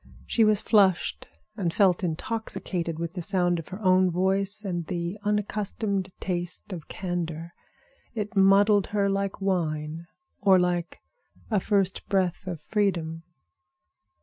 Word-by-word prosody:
She 230 - +2
was 215 -1 +4
flushed 195 -5 +2 0.3
and 185 -6 -1
felt 190 -1 +3
intoxicated 175 -2 -3
with 170 0 -4
the 180 - -4
sound 175 -1 +1
of 165 - -8
her 190 +2 -7
own 185 0 +5
voice 195 +4 0
and 175 -5 -3
the 175 +3 -3
unaccustomed 205 -1 -1
taste 175 +1 -3
of 165 -4 -8
candor. 170 -2 -4 0.6
It 210 0 -4
muddled 200 +1 +5
her 200 -1 +1
like 195 0 -2
wine, 165 -3 -1 0.3
or 195 -2 +5
like 175 -1 -1 0.5
a 210 - +3
first 195 -1 0
breath 190 -1 0
of 170 -4 -4
freedom. 170 -5 -1
185 Hz, 130 wpm, -26 LUFS, 170-200 Hz, 0.6 s, own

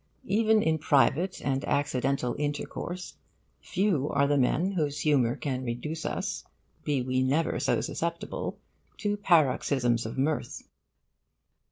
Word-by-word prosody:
Even 215 +2 +3
in 160 0 +1
private 155 +5 +2
and 135 0 -1
accidental 135 -2 0
intercourse, 160 +4 -4 0.4
few 180 -7 0
are 140 0 +2
the 145 +1 +2
men 145 +8 +2
whose 150 -6 -1
humour 130 -6 +3
can 130 -3 -3
reduce 130 +7 -4
us, - - -3 0.4
be 140 -4 0
we 130 0 0
never 140 +5 +1
so - - +1
susceptible, 170 0 -3 0.4
to 205 -1 -1
paroxysms 135 - +2
of 115 - -7
mirth. 145 +3 -1
145 Hz, 125 wpm, -28 LUFS, 130-170 Hz, 0.4 s, Even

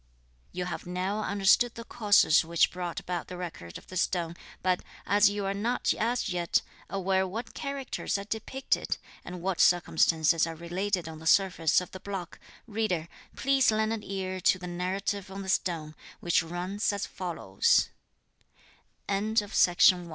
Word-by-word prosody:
You 180 0 -3
have 180 - -5
now 185 +4 -2
understood 205 +4 +3
the 230 - -7
causes 205 -9 +4
which 165 +1 +2
brought 180 -1 -4
about 175 -1 -4
the 180 - -7
Record 165 - -7
of - - -15
the 185 - -7
Stone, 170 -2 0 0.3
but 185 -1 +2 0.2
as 205 0 +5
you 205 -1 -3
are 195 - 0
not, 230 +5 0
as 240 +3 -1
yet, 175 -2 +1 0.3
aware 190 -1 +1
what 225 +6 -6
characters 275 -6 -3
are 200 - -5
depicted, 225 +5 -2 0.3
and 175 -1 -8
what 190 -2 -1
circumstances 165 -2 +3
are 165 - -5
related 175 +2 -2
on 160 -1 -8
the 160 - -6
surface 180 -3 +4
of 180 - -9
the 185 - -8
block, 190 -3 -6 0.3
reader, 205 -7 -2 0.3
please 270 -1 +3
lend 220 0 +1
an 225 - -4
ear 190 -2 -4
to 185 - +4
the 180 - -8
narrative 190 +3 -3
on 195 +1 -6
the 190 - -6
stone, 165 -5 -1 0.3
which 175 -1 +2
runs 180 +6 -2
a 200 - -3
185 Hz, 150 wpm, -29 LUFS, 175-205 Hz, 0.3 s, as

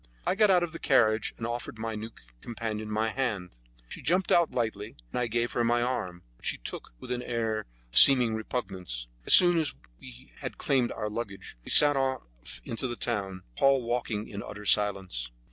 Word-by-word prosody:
I - - +2
got 210 +1 +3
out 180 -2 +4
of 170 - -3
the 165 - -8
carriage, 110 -5 +2
and 115 - -5
offered 120 -1 -5
my 110 0 -4
new 110 +1 -6 0.3
companion 110 -2 -5
my 110 +1 0
hand. 105 - -3 0.3
She - - -9
jumped 180 +3 +1
out 170 -2 +4
lightly, 110 -3 -3 0.2
and - - -2
I 125 - 0
gave 120 +1 0
her 120 - 0
my 120 +1 +2
arm, 90 -8 -3
which - - -7
she - - 0
took - - -8
with - - -8
an 125 0 -1
air 115 -3 -2
of - - -10 0.3
seeming 125 -5 +7
repugnance. 95 - -4 0.2
As - - +10
soon 175 -2 +6
as 155 - -1 0.2
we 130 +1 -13
had 130 -3 -6
claimed 130 -4 +1
our 105 - -4
luggage 105 - -6
we - - -10
set 145 -1 +7
off 135 -1 -1 0.4
into 115 +3 -3
the 120 - -4
town, 95 -6 -3
Paul 135 - +3
walking 115 -3 -2
in 100 -2 -7
utter 105 0 -9
silence. 95 -13 +2
115 Hz, 195 wpm, -28 LUFS, 105-130 Hz, 0.4 s, As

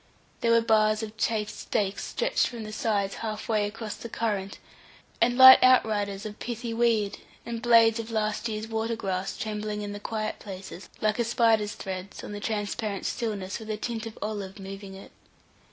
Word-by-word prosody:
There 230 - +1
were 230 0 +5
bars 215 -1 +3
of 215 0 -6
chafed 215 -1 -1
stakes 205 -2 -2
stretched - - +1
from 235 -3 -7
the 215 - -7
sides 205 -3 0
half 215 -1 -4
way 215 -2 +1
across 220 +1 -6
the 235 - -8
current, 205 -4 -2 0.6
and 245 +1 +3
light 260 0 +11
outriders 210 -5 +3
of 210 0 -7
pithy 235 -1 -4
weed, 225 -3 +1 0.3
and 235 -1 -4
blades 230 -1 +5
of 225 0 -5
last 215 0 -1
year's 215 0 -4
water 225 +1 -1
grass 190 -3 -3
trembling 210 -1 -3
in 205 - -4
the 205 - -6
quiet 215 +1 -3
places, 190 -1 -9
like 215 +1 +1
a - - +3
spider's 225 -2 +2
threads, 190 0 -6
on - - -7
the 205 - -5
transparent 210 -1 -3
stillness, 205 -4 -3
with 220 -1 -10
a 215 - -2
tint 225 0 -4
of 220 - -10
olive 205 -2 -4
moving 195 0 -8
it. 195 - -12
215 Hz, 185 wpm, -27 LUFS, 205-230 Hz, 0.6 s, light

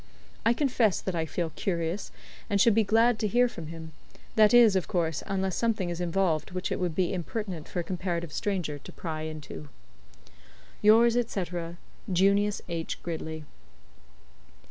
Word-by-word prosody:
I 230 - +5
confess 240 - +2
that 190 - -3
I 165 -2 -1
feel 165 0 -2
curious, 170 +2 -2 0.4
and 200 - +1
should 230 +3 +6
be 225 +1 +4
glad 225 +2 +3
to 215 - +1
hear 245 +4 +4
from 170 -9 -8
him 160 0 -8 0.4
that 215 -1 +6
is, 235 -4 +7
of 180 -5 0
course, 165 -4 -1
unless 190 -2 -1
something 215 -6 0
is 170 +1 -4
involved 175 -2 0
which 185 0 -3
it - - -1
would 175 -3 -1
be 185 0 +1
impertinent 185 -2 -4
for 175 - -2
a - - -6
comparative 170 -3 -3
stranger 180 -8 -2
to - - -11
pry 160 -3 -5
into. 155 - -7 1.1
"Yours, 230 +2 +6 0.2
&c., 195 - -1 0.7
"JUNIUS 200 +3 +2
H. 165 -2 -4
GRIDLEY." 160 -2 -5
185 Hz, 160 wpm, -28 LUFS, 165-210 Hz, 1.1 s, is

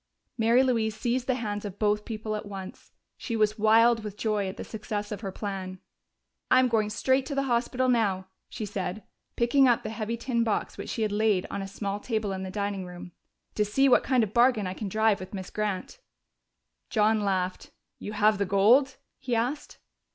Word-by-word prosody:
Mary 235 +2 +4
Louise 225 -4 0
seized 245 +2 -1
the 260 - +2
hands 210 -4 -3
of 205 -2 -6
both 210 0 +1
people 215 -1 -4
at 210 0 -6
once. 195 -2 -9 0.3
She 230 - -4
was 215 0 +1
wild 225 +1 +5
with 210 -1 -7
joy 210 -3 0
at 190 - -8
the - - -5
success 210 -1 -5
of 210 -1 -5
her 195 - -4
plan. 190 -2 -5 0.7
"I'm 255 0 +5
going 215 -2 +1
straight 260 +5 +1
to 285 - -4
the 275 - +1
hospital 250 0 0
now," 205 -6 +1 0.2
she 215 - -5
said, 190 0 -4 0.3
picking 260 +3 +4
up 240 -2 +3
the 215 - -4
heavy 225 +1 -3
tin 235 -1 0
box 220 -3 -1
which - - -7
she 225 - -2
had 215 - 0
laid 205 -3 +2
on 200 - -3
a 195 - -5
small 200 +1 -4
table 215 -2 -2
in 190 - -4
the 190 - -5
dining 200 0 -3
room, 180 0 -9 0.4
"to 210 - +1
see 240 +7 +2
what 255 - +5
kind 255 -3 +2
of 215 -1 -4
bargain 240 -3 +4
I 185 - -3
can 200 +1 -5
drive 215 0 +2
with 185 +2 -8
Miss 190 -1 -7
Grant!" 210 - -3 0.9
John 215 0 +2
laughed. 185 -2 -1 0.3
"You 210 - -6
have 210 0 +3
the 200 - +1
gold?" 235 +8 +4 0.2
he 255 -3 -2
asked. 250 +6 -2
215 Hz, 205 wpm, -27 LUFS, 200-235 Hz, 0.9 s, wild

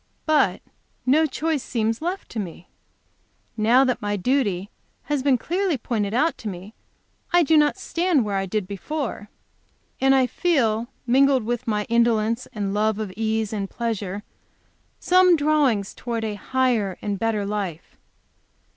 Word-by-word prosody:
But 310 -1 +2 0.4
no 305 +5 +4
choice 310 +1 -1
seems 225 0 -1
left 360 +4 -3
to 230 - -5
me. 175 -3 -7 0.8
Now 235 +4 +4
that 255 -2 0
my 205 0 -1
duty 200 -4 0 0.3
has 290 -2 -1
been 270 -1 +3
clearly 355 - -1
pointed 220 -4 -2
out 295 +9 +1
to 225 - -6
me, 190 +3 -9 0.6
I 350 0 +5
do 320 +1 +3
not 300 +3 +4
stand 345 - +1
where 205 -1 -2
I 195 0 -2
did 205 0 -2
before. 210 - -5 0.7
And 270 0 +4
I 260 -1 +4
feel, 240 -8 +1 0.2
mingled 265 +1 +4
with 240 +2 -3
my 210 -2 0
indolence 230 0 +1
and 200 -2 -3
love 215 0 +1
of 210 -4 -4
ease 220 -1 -1
and 200 -2 -3
pleasure, 210 -4 -3 0.8
some 365 -1 +5
drawings 285 -10 +1
towards 230 -2 -4
a 215 - -2
higher 225 -3 0
and 205 -2 -2
better 220 -2 0
life. 200 -5 -4
230 Hz, 150 wpm, -23 LUFS, 210-280 Hz, 0.8 s, I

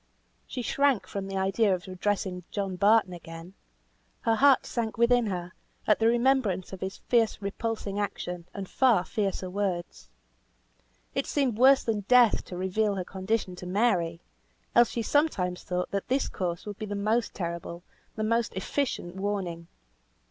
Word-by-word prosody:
She 250 - -4
shrank 270 -7 +2
from 195 +1 -5
the 195 0 -4
idea 195 +1 +2
of 180 +2 -9
addressing 185 -1 -2
John 195 -2 -3
Barton 205 0 +4
again; 165 +1 -10 0.7
her 225 - +2
heart 270 +3 +5
sank 230 -1 -3
within 235 0 +4
her, 180 -2 -4 0.3
at 210 - +3
the 225 - +3
remembrance 235 -6 +2
of 190 - -8
his 190 0 -4
fierce 230 -3 +1
repulsing 205 0 -3
action, 180 -4 -4
and 195 -2 -6
far 235 -8 +3
fiercer 195 -4 -2
words. 180 -2 -3 1.0
It - - -1
seemed 260 -7 0
worse 270 +2 +6
than 225 -2 0
death 250 -3 +5
to 180 - -7
reveal 200 +3 0
her 185 -2 -3
condition 190 0 -2
to 180 - -7
Mary, 180 -5 +1 0.5
else 240 -1 +6
she 230 - -3
sometimes 205 - +1
thought 180 0 -2
that 200 -1 -2
this 265 +2 +1
course 175 -3 -3
would 205 -1 -7
be 215 - -4
the 205 - -3
most 215 +3 0
terrible, 170 -1 -5 0.3
the 215 - -2
most 230 0 0
efficient 190 -3 -2
warning. 190 -4 -3
200 Hz, 160 wpm, -28 LUFS, 180-230 Hz, 1.0 s, worse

